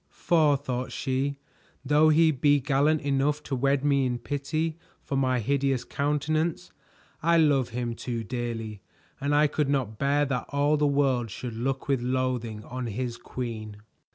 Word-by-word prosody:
"For," 155 -4 +2
thought 130 -2 -4
she, 135 +1 -1 0.5
"though 150 +3 +5
he 160 +1 +5
be 145 +1 +3
gallant 145 +3 +2
enough 145 +2 0
to 135 - -3
wed 135 +2 +1
me 140 -2 +3
in 125 -1 -1
pity 155 +5 -3 0.2
for 140 - -3
my 130 -2 +2
hideous 135 +1 0
countenance, 155 +4 -1 0.5
I 170 +2 +4
love 145 -6 +3
him 120 0 -3
too 115 -1 -4
dearly, 115 -3 -4 0.4
and 145 +1 0
I 150 +1 +5
could 150 -1 0
not 125 -7 -1
bear 145 +1 +2
that 125 -4 -2
all 145 +1 +2
the 150 0 +2
world 135 -5 +1
should 120 +3 -6
look 130 +4 -3
with 135 -3 +1
loathing 125 -4 -2
on 125 0 -5
his 120 +2 -3
queen." 115 -3 -6
135 Hz, 160 wpm, -27 LUFS, 125-145 Hz, 0.5 s, though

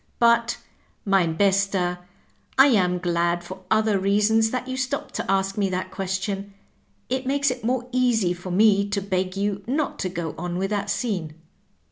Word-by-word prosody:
But, 235 0 +3 0.5
Tiimi 180 -5 +2
Bester^ 195 -2 +1 0.6
I 270 - +9
am 180 -7 +2
glad 175 0 0
for 185 +2 -9
other 220 -1 +2
reasons 210 +3 +3
that 255 +1 -3
you 260 - -3
stopped 265 +2 -3
to - - -2
ask 195 +1 0
me 195 -1 +1
that 185 0 -3
question. 195 +1 -3 0.5
It 260 0 -2
makes 280 0 +2
it 250 -2 -6
more 245 +1 -1
easy 240 -8 +2
for 180 +1 -8
me 200 +1 +4
to 200 0 0
beg 185 -1 -2
you 200 0 -1
not 285 +4 -1
to 185 - -1
go 170 -2 -4
on 175 0 -3
with 195 +2 -2
that 205 -1 -1
scene." 180 -10 -2
200 Hz, 170 wpm, -24 LUFS, 185-230 Hz, 0.6 s, I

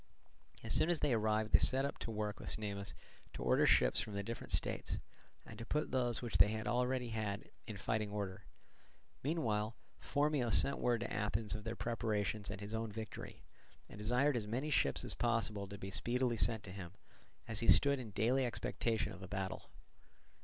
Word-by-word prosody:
As - - 0
soon 160 - +4
as 175 -3 +1
they 140 - +2
arrived 110 -1 +1
they - - +7
set 135 +2 +2
to - - -4
work 105 -1 -3
with - - -6
Cnemus 100 -3 -4 0.4
to - - -5
order - - +4
ships 60 -1 +4
from 105 - -4
the 100 - -2
different 115 +3 -6
states, - - +1 0.5
and - - -10
to - - -5
put 150 +6 -1
those 125 -2 +1
which 120 - -1
they 110 +2 +5
already 125 +3 0
had 110 -2 -3 0.2
in 110 -3 -5
fighting 105 +2 -1
order. 100 -2 -4 0.8
Meanwhile 115 -8 0 0.2
Phormio 145 -4 +1
sent 140 - +4
word 120 -2 +1
to - - -3
Athens 105 +1 -1
of 105 -1 -6
their 115 - -3
preparations 110 -3 -1
and 95 - -5
his 105 +1 -6
own 110 -1 -2
victory, 110 0 -7 0.4
and - - -11
desired 125 +6 +2
as 110 -3 -2
many 130 +8 -2
ships - - +2
as - - 0
possible 110 -4 0
to 100 +1 -8
be 95 0 -6
speedily 120 +3 +1
sent 110 -1 +2
to 95 - -8
him, 90 -2 -8 0.5
as 110 -2 -2
he 115 - -1
stood 140 -1 +7
in 120 -4 -6
daily 115 +6 +2
expectation 115 -3 -1
of 95 - -11
a 95 - -7
battle. 95 0 -4
110 Hz, 190 wpm, -36 LUFS, 105-120 Hz, 0.8 s, they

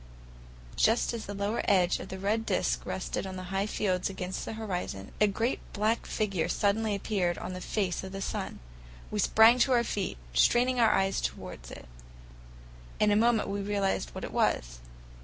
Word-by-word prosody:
Just 230 +2 +3
as 230 -2 -5
the 205 - -5
lower 205 +3 -1
edge 185 -3 +3
of - - -8
the 190 - -5
red 210 +4 0
disc - - -1
rested - - -3
on 190 - -6
the 185 - -6
high 195 +2 0
fields 185 -4 0
against 185 -1 -4
the - - -5
horizon, 180 - -4
a 210 - +6
great 225 +5 -1
black 215 +2 0
figure 195 -6 -1
suddenly 205 +2 +1
appeared 190 -4 -1
on 185 - -5
the 185 - -6
face 190 -4 -1
of 190 - -7
the 195 - -5
sun. 195 - -4 0.5
We 210 - -2
sprang 225 +4 +6
to 260 +1 +4
our 240 -1 +4
feet, 205 - -3 0.2
straining 245 - +3
our 230 -2 +6
eyes 195 -1 +1
toward - - -5
it. - - -10 1.1
In 210 0 +4
a - - +4
moment 225 0 +3
we 200 0 -2
realized 200 -1 -1
what - - -6
it - - -6
was. - - 0
200 Hz, 185 wpm, -29 LUFS, 185-220 Hz, 1.1 s, a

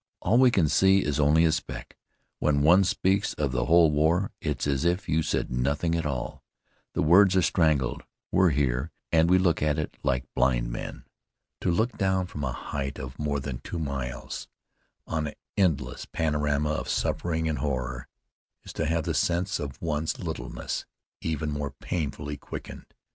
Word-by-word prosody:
All 115 +7 +3
we 130 -1 +7
can 95 -9 +3
see 95 +5 +4
is 75 0 -1
only 75 +3 +5
a 80 - +4
speck. 80 - -5 0.4
When 70 -1 +2
one 90 +5 +6
speaks 95 +1 +1
of 75 -4 -1
the 65 -1 0
whole 85 -1 +5
war, 80 +6 +2
it's - - -2
as 70 0 0
if 90 +3 0
you 80 +1 +2
said 75 - -1
nothing 70 +7 0
at 85 -2 0
all 65 -4 -4 0.5
the - - 0
words 95 +4 +6
are 95 - +4
strangled. 75 -10 +2 0.3
We're 95 -1 +4
here, 70 -1 0 0.2
and 80 +1 +4
we 90 - +6
look 90 -3 +2
at 75 0 +1
it 75 - -3
like 65 -2 0
blind - - +1
men." - - -6 0.6
To - - -1
look 110 +8 0
down 95 -2 +1
from 75 -5 -6
a 65 - -1
height 70 +1 -4
of 65 0 -8
more 75 -1 -1
than 65 -3 -5
two 85 - -6
miles, 70 -5 -4 0.6
on 80 -1 -2
an - - -6 0.2
endless 75 -10 0
panorama 75 -2 0
of 75 - -3
suffering 80 -2 0
and 80 - -1
horror, 65 -3 -3 0.6
is - - -9
to 80 - -1
have 80 0 +1
the - - -1
sense 90 +2 0
of 70 -3 -6
one's 80 -1 -1
littleness - - -5 0.3
even 75 -1 -2
more 75 -1 -2
painfully 75 0 -4
quickened. - - -9
75 Hz, 175 wpm, -27 LUFS, 70-85 Hz, 0.6 s, we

